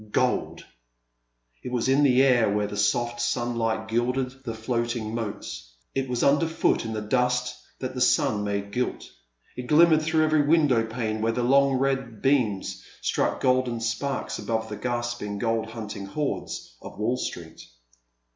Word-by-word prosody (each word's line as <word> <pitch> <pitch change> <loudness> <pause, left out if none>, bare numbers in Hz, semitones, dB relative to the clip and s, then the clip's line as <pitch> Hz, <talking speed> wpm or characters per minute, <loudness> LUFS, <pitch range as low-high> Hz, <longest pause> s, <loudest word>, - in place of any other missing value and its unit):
Gold! 125 +2 0 1.0
It 125 - -6
was 125 0 0
in 135 +2 +4
the 135 -2 +5
air 120 -5 +4
where 105 +1 +1
the 105 - -5
soft 120 +4 0
sunlight 115 -3 -1
gilded 125 +3 0
the 115 -3 -4
floating 115 -1 -2
moats, 105 - -6 0.2
it 135 -1 -2
was 125 -1 -1
under 145 +4 +4
foot 160 -6 +1
in 110 - -3
the 110 -1 -3
dust 125 +1 +1 0.2
that 130 0 -5
the 125 - -4
sun 125 -5 +3
made 100 0 -3
gilt, 125 +3 -2 0.5
it 125 0 -6
glimmered 155 +1 +6
fi 160 +1 -1
om 155 - +5
every 155 -1 +3
window 145 -6 +3
pane 110 -2 -3
where 115 +1 +1
the 125 - -1
long 140 +2 +4
red 135 -4 -1
beams 105 -8 0 0.2
struck - - 0
golden 130 -2 +2
sparks 125 +4 -2
above 110 -1 -2
the 105 - -4
gasping 120 -2 -3
gold 115 +1 0
hunting 105 -3 -6
hordes 145 - -4
of - - -10
Wall 110 +4 0
Street. 85 -8 -6
120 Hz, 165 wpm, -26 LUFS, 110-130 Hz, 1.0 s, glimmered